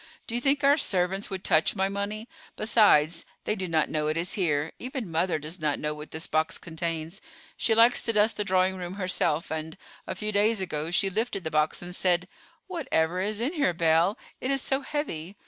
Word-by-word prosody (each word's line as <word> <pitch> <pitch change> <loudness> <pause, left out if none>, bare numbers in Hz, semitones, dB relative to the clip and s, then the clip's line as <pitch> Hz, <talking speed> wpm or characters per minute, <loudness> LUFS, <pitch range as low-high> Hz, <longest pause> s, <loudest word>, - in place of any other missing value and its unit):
"Do - - -6
you 240 - 0
think 280 +2 +2
our 280 +2 +6
servants 190 -3 0
would 190 -1 -5
touch 155 +5 +3
my 190 -1 +1
money? 200 +3 -4 0.3
Besides, 175 -8 +4 0.2
they - - 0
do 190 -3 -3
not 160 -2 +2
know 150 -1 -1
it 155 +1 0
is 175 +2 -1
here; 155 -5 0
even 250 -7 -5
mother 165 +1 +1
does 155 +4 -7
not 150 -2 0
know 150 0 -2
what 150 0 -9
this 160 +1 -3
box 160 +3 0
contains. 165 +2 -4 0.3
She 225 - +2
likes 230 +2 +5
to 230 - 0
dust 215 +1 +3
the 210 - +1
drawing 185 -1 +2
room 180 0 -6
herself, 180 -5 0
and, 160 +2 -4 0.3
a - - -3
few 215 0 -2
days 210 +1 +2
ago, 160 -4 -2
she 190 +2 +2
lifted 215 -1 -2
the 160 - -4
box 155 +2 +1
and 175 0 -7
said: 180 -1 +1 0.4
'Whatever 185 - -1
is 205 +2 -1
in 255 +8 -1
here, 280 - +1
Belle? 165 +5 +3 0.2
It 255 - -3
is 275 -1 +1
so 270 +1 0
heavy? 200 - -4
185 Hz, 210 wpm, -27 LUFS, 160-215 Hz, 0.4 s, our